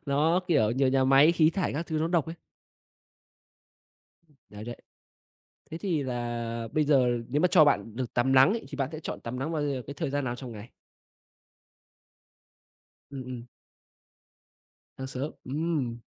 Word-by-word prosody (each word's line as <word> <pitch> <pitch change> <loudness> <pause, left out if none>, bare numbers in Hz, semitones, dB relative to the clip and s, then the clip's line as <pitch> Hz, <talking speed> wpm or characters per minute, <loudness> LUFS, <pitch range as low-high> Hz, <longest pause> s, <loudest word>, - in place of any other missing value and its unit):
Nó, 155 +6 +2
kiểu, 110 -10 +3
nhiều 130 +2 +2
nhà 130 0 +2
máy 135 +5 +6
khí 160 -2 +4
thải 185 +2 -1
các 160 +4 -3
thứ 160 -2 -2
nó 160 +1 0
độc 170 -4 +1
ấy. 165 - -6 2.2
Đấy, 105 +1 -9
đấy. 120 +1 -6 1.0
Thế 160 - -4
thì 170 -6 -1
là 120 -2 -3
bây 155 - +2
giờ 135 -4 +4 0.2
nếu 145 +4 +1
mà 180 - +5
cho 165 -4 +6
bạn 115 -6 +1
được 125 -2 -4
tắm 130 +2 +2
lắng 130 +6 +7
ấy, 230 - -4
thì - - -7
bạn 135 -1 -1
sẽ 155 - -6
chọn - - -6
tắm 120 +2 -5
nắng 145 +5 -3
vào 155 -2 -1
giờ 140 -3 -2
cái 140 - -5
thời 140 - -3
gian 145 0 -1
nào 120 -1 -2
trong 125 -1 -8
ngày? 110 +1 -10 2.4
Ừm, 135 -2 -6
ừm. 125 -2 -7 1.5
Sáng 130 - -5
sớm, 130 +3 -4
ừm. 140 -4 -2
135 Hz, 170 wpm, -28 LUFS, 125-155 Hz, 2.4 s, lắng